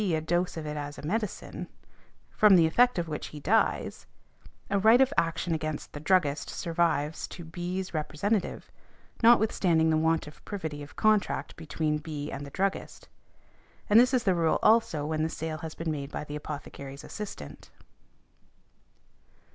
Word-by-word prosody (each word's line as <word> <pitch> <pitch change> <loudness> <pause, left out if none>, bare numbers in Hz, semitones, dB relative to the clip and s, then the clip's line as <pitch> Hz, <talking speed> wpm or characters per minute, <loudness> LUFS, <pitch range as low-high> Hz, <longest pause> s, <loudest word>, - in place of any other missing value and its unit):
a - - 0
dose 175 +3 -1
of 160 - -5
it 150 0 -4
as 145 -1 -5
a - - -9
medicine, 210 +5 -3 0.6
from 210 -2 +6
the 170 -2 +6
effect 245 +9 +3
of 170 -1 -1
which 150 -2 -4
he 150 - -9
dies, 215 +10 0 0.6
a 200 - +3
right 220 +5 +6
of 265 +1 +4
action 165 +1 0
against 155 -1 -4
the 145 - -6
druggist 150 -2 +1
survives 165 -3 -1
to 175 - -9
B.'s 180 +3 -4
representative, 175 +6 -2 0.5
notwithstanding 195 -8 +4
the 160 - +3
want 160 +1 +1
of 150 - -13
privity 160 -8 -5
of 145 - -11
contract 215 -2 +1
between 155 -1 -2
B. 150 -1 -6
and 140 - -5
the - - -8
druggist. 195 +6 -3 0.8
And 215 - +8
this 250 +2 +5
is 255 -3 +2
the 190 -4 +3
rule, 165 -2 +2
also, 220 -10 +3
when 155 0 -1
the 160 - 0
sale 160 -1 -4
has 160 0 -7
been 165 -1 -3
made 140 -1 -5
by - - -4
the 150 0 -7
apothecary's 140 -2 -7
assistant. 75 - -8
160 Hz, 165 wpm, -28 LUFS, 150-195 Hz, 0.8 s, And